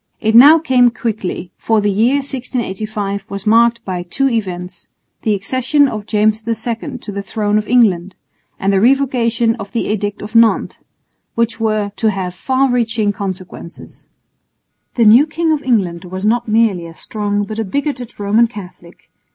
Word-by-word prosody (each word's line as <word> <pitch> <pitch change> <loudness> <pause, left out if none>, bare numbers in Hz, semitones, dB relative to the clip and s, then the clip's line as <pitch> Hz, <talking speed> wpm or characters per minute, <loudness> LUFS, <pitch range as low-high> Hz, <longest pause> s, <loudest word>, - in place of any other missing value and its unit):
It 220 0 0
now 285 +8 +9
came 260 -6 +3
quickly, 210 -6 -4
for 225 -1 +1
the 205 0 +1
year 225 +7 +2
1685 220 -7 -4
was 200 -1 -5
marked 235 +1 +3
by 185 -2 -3
two 180 +10 -1
events 185 -7 -4 0.3
the 215 -2 +1
accession 260 +8 +1
of 215 -4 -6
James 215 +1 +1
II 230 +4 -3
to 230 - -8
the 200 0 -4
throne 210 +1 -1
of 210 - -6
England, 195 -7 +2 0.4
and 195 +1 0
the 195 - +3
Revocation 240 -2 +2
of 200 -3 -8
the 235 - 0
Edict 205 -1 -3
of 210 +1 -9
Nantes 230 -1 +2 0.6
which 230 0 0
were 215 -2 -1
to 220 - +1
have 190 -3 -3
far 260 +6 0
reaching 225 -4 0
consequences. 185 -3 -8 0.9
The 235 - +3
new 235 +8 +6
King 325 +1 -1
of 305 -2 0
England 190 -9 -1
was 185 +2 -5
not 235 +2 +1
merely 215 -6 +1
a 165 - -13
strong 205 +1 -3
but 215 +2 -6
a - - 0
bigoted 250 +2 -4
Roman 210 +3 +3
Catholic. 185 -5 -12
220 Hz, 165 wpm, -16 LUFS, 200-240 Hz, 0.9 s, now